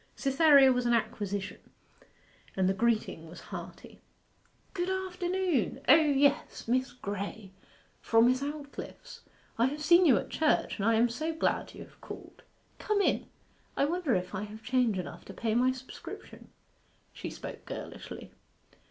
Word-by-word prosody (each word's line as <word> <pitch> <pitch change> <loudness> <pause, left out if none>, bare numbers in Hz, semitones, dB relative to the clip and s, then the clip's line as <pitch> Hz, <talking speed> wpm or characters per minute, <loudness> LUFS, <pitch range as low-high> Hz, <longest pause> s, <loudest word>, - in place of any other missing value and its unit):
Cytherea 275 -1 +6
was 250 -1 0
an 240 - +4
acquisition, 205 -3 -3 1.0
and 190 -1 +3
the 190 - +3
greeting 215 -7 0
was 175 - -10
hearty. - - -10 0.7
'Good 360 -1 -2
afternoon! 370 - -1
O 260 - +9
yes 290 -3 +2
Miss 255 +2 +1
Graye, 200 -2 -6 0.5
from 225 0 +4
Miss 255 +2 +3
Aldclyffe's. 285 0 -7 0.4
I 235 - +5
have 295 +3 -4
seen 345 +3 +6
you 255 -7 +6
at - - -4
church, 310 -1 +1
and 200 - +1
I 230 - +4
am 230 +2 +4
so 310 +7 -3
glad 320 - -1
you - - -8
have - - -20
called! - - -10 0.4
Come 425 -1 0
in. 400 - +1 0.5
I - - +3
wonder 325 - 0
if 180 0 -3
I 190 - -3
have 215 +1 -11
change 245 -5 +1
enough 175 -2 -6
to - - -10
pay 225 -2 -1
my 250 +3 +3
subscription.' 260 0 -10 0.6
She - - -6
spoke - - -9
girlishly. - - -8
255 Hz, 150 wpm, -30 LUFS, 220-305 Hz, 1.0 s, O